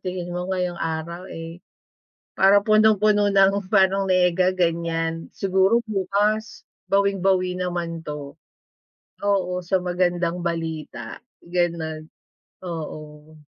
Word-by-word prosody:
tingin 180 Hz, -1 st, -5 dB
mo 180 Hz, +1 st, -4 dB
ngayong 180 Hz, -2 st, -2 dB
araw, 165 Hz, +3 st, -4 dB
eh, 165 Hz, +1 st, -8 dB, 0.8 s
parang 195 Hz, +1 st, +6 dB
punong-puno 215 Hz, -1 st, +4 dB
ng 195 Hz, 0 st, +4 dB
parang 195 Hz, 0 st, +4 dB
nega 185 Hz, 0 st, +3 dB
ganyan, 165 Hz, -2 st, -1 dB
siguro 195 Hz, +4 st, +2 dB
bukas 210 Hz, +2 st, 0 dB, 0.3 s
bawing-bawi 190 Hz, -2 st, +2 dB
naman 170 Hz, -2 st, -3 dB
'to. 150 Hz, -1 st, -7 dB, 0.9 s
Oo. 180 Hz, -3 st, 0 dB
Sa 185 Hz, +2 st, +1 dB
magandang 175 Hz, -1 st, -1 dB
balita, 160 Hz, -8 st, -5 dB, 0.2 s
ganon. 165 Hz, -3 st, -2 dB, 0.5 s
Oo. 155 Hz, -2 st, -8 dB
180 Hz, 100 wpm, -23 LUFS, 165-195 Hz, 0.9 s, parang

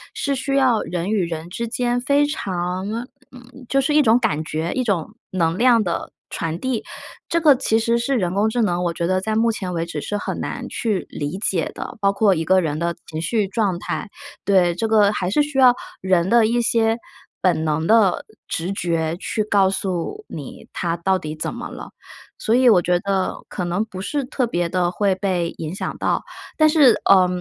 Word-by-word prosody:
是 280 Hz, -, -1 dB
需 275 Hz, +1 st, -2 dB
要 255 Hz, -5 st, +3 dB
人 180 Hz, +3 st, -3 dB
与 200 Hz, -5 st, +1 dB
人 165 Hz, 0 st, -5 dB
之 235 Hz, +5 st, -3 dB
间 245 Hz, +1 st, -1 dB
非 285 Hz, +3 st, +3 dB
常 185 Hz, -8 st, -3 dB, 0.4 s
嗯， 250 Hz, +1 st, -14 dB
就 275 Hz, -, +2 dB
是 295 Hz, +3 st, 0 dB
一 300 Hz, -, +6 dB
种 230 Hz, -4 st, +5 dB
感 210 Hz, -, 0 dB
觉， 160 Hz, +2 st, -3 dB
一 255 Hz, -, 0 dB
种 200 Hz, -3 st, -1 dB, 0.2 s
能 165 Hz, -3 st, 0 dB
量 240 Hz, -3 st, +5 dB
的 170 Hz, -2 st, -3 dB, 0.2 s
传 165 Hz, +1 st, -3 dB
递。 260 Hz, -4 st, -2 dB, 0.5 s
这 335 Hz, -, +1 dB
个 300 Hz, -4 st, +6 dB
其 225 Hz, -3 st, +1 dB
实 230 Hz, +1 st, +1 dB
是 255 Hz, +3 st, 0 dB
人 185 Hz, -3 st, -1 dB
工 210 Hz, +2 st, +2 dB
智 240 Hz, +1 st, 0 dB
能， 180 Hz, -4 st, +1 dB
我 170 Hz, -, 0 dB
觉 170 Hz, 0 st, -2 dB
得 185 Hz, 0 st, +1 dB
在 215 Hz, +3 st, -2 dB
目 230 Hz, +1 st, +3 dB
前 185 Hz, -4 st, -4 dB
为 165 Hz, -1 st, -1 dB
止 155 Hz, -3 st, -4 dB
是 205 Hz, -, -3 dB
很 -, -, -4 dB
难 -, -, -4 dB
去 215 Hz, -5 st, -2 dB
理 145 Hz, +5 st, -4 dB
解 185 Hz, -5 st, -1 dB
的。 -, -, -7 dB
包 200 Hz, -1 st, +2 dB
括 200 Hz, -2 st, +3 dB
一 160 Hz, 0 st, -2 dB
个 190 Hz, +2 st, +4 dB
人 150 Hz, -2 st, -2 dB
的 170 Hz, +1 st, -1 dB
情 155 Hz, -1 st, -5 dB
绪 205 Hz, +4 st, 0 dB
状 200 Hz, -4 st, -1 dB
态， 205 Hz, -, -4 dB, 0.4 s
对。 185 Hz, -3 st, +3 dB
这 225 Hz, +5 st, -1 dB
个 210 Hz, -2 st, +4 dB
还 180 Hz, -3 st, -2 dB
是 300 Hz, -, +3 dB
需 290 Hz, -2 st, -3 dB
要 250 Hz, -2 st, +7 dB, 0.3 s
人 185 Hz, -1 st, +2 dB
的 235 Hz, 0 st, +5 dB
一 240 Hz, +2 st, +1 dB
些 225 Hz, 0 st, +2 dB, 0.4 s
本 175 Hz, -4 st, +2 dB
能 160 Hz, +1 st, 0 dB
的 220 Hz, -4 st, +4 dB, 0.2 s
直 175 Hz, +4 st, -3 dB
觉， 165 Hz, -3 st, -1 dB
去 215 Hz, +3 st, -2 dB
告 200 Hz, -2 st, +3 dB
诉 195 Hz, -, -3 dB
你 -, -, -9 dB
他 170 Hz, -1 st, -1 dB
到 190 Hz, +3 st, +1 dB
底 155 Hz, -3 st, -6 dB
怎 155 Hz, -, -3 dB
么 -, -, -6 dB
了。 -, -, -9 dB, 0.5 s
所 220 Hz, -, 0 dB
以 250 Hz, -1 st, +5 dB
我 200 Hz, -, +6 dB
觉 175 Hz, 0 st, +1 dB
得， 195 Hz, -1 st, -1 dB
可 180 Hz, -, -4 dB
能 175 Hz, +5 st, 0 dB
不 190 Hz, -4 st, -9 dB
是 285 Hz, +7 st, -2 dB
特 255 Hz, -1 st, -1 dB
别 175 Hz, -6 st, -1 dB
地 180 Hz, -1 st, 0 dB
会 195 Hz, +1 st, +1 dB
被 185 Hz, -3 st, -1 dB
影 160 Hz, +2 st, -5 dB
响 -, -, -4 dB
到。 -, -, 0 dB, 0.3 s
但 310 Hz, -, +6 dB
是， 285 Hz, -8 st, +5 dB
呃， 185 Hz, -2 st, +6 dB
195 Hz, 230 characters per minute, -21 LUFS, 175-235 Hz, 0.5 s, 要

